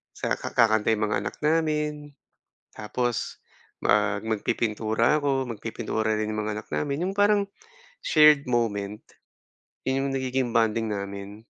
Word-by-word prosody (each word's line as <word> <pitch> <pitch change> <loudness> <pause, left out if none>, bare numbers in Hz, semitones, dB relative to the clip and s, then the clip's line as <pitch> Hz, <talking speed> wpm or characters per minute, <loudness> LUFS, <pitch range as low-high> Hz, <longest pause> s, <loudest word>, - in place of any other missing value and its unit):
sa - - -1
kakanta 110 -3 +2
'yong 110 0 0
mga - - +2
anak - - -6
namin, 150 -2 0 0.6
tapos 120 +2 -3 0.4
mag 105 -1 +2
magpipintura 110 +3 0
ako, 135 -3 0
magpipintura 110 0 -2
rin 110 0 -1
'yong 110 0 -2
mga 105 - -2
anak 115 - -28
namin. 145 +1 -2
'Yong 195 - -5
parang 205 0 +4 0.6
shared 150 -4 +5
moment. 105 -4 -1 0.9
'Yon 135 +1 +1
'yong - - -3
nagiging 130 -1 -1
bonding 115 -1 +1
namin. 100 +1 -6
115 Hz, 130 wpm, -26 LUFS, 105-140 Hz, 0.9 s, shared